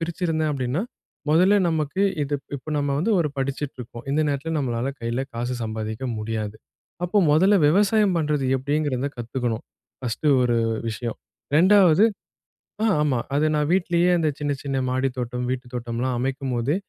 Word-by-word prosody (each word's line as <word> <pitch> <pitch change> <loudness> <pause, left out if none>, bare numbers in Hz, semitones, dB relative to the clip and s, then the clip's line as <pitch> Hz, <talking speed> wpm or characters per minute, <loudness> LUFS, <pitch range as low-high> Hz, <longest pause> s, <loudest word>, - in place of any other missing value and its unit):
பிரிச்சுருந்தேன் 165 -2 -1
அப்படீன்னா? 130 +5 -1 0.5
முதல்ல 180 +6 +5
நமக்கு 155 +2 -1 0.2
இது 145 0 -2
இப் 140 - -23
இப்ப 155 +4 -7
நம்ம 145 -1 0
வந்து 180 +9 +1
ஒரு 155 - +1
படிச்சுட்ருக்கோம். 135 -3 -4
இந்த 145 +3 +2
நேரத்தில 145 +2 -2
நம்மளால 120 -2 -1
கையில 115 +2 -2
காசு 120 +2 -2
சம்பாதிக்க 110 +2 -4
முடியாது. 110 -1 -3 0.5
அப்ப 190 +4 +2
முதல்ல 190 +7 +5
விவசாயம் 205 +2 +3
பண்றது 150 -3 0
எப்படீங்கிறத 140 0 -1
கத்துக்கணும், 120 -1 -3 0.4
ஃபர்ஸ்ட்டு 125 +4 -1
ஒரு 120 -1 +2 0.3
விஷயம். 115 +1 -4 0.4
2வது, 190 +1 +6 0.8
ஆ 225 - +3 0.2
ஆமா. 135 -5 +1 0.2
அது 150 +2 +3
நா 150 - +2
வீட்டிலேயே 175 -1 +2
அந்த 160 - +2
சின்ன, 145 -1 -1
சின்ன 135 -1 -1
மாடி 130 +1 +1
தோட்டம், 125 0 -3
வீட்டு 130 0 -3
தோட்டம்லாம் 120 +1 -2
அமைக்கும்போது 130 +1 -1
140 Hz, 145 wpm, -24 LUFS, 120-160 Hz, 0.8 s, 2வது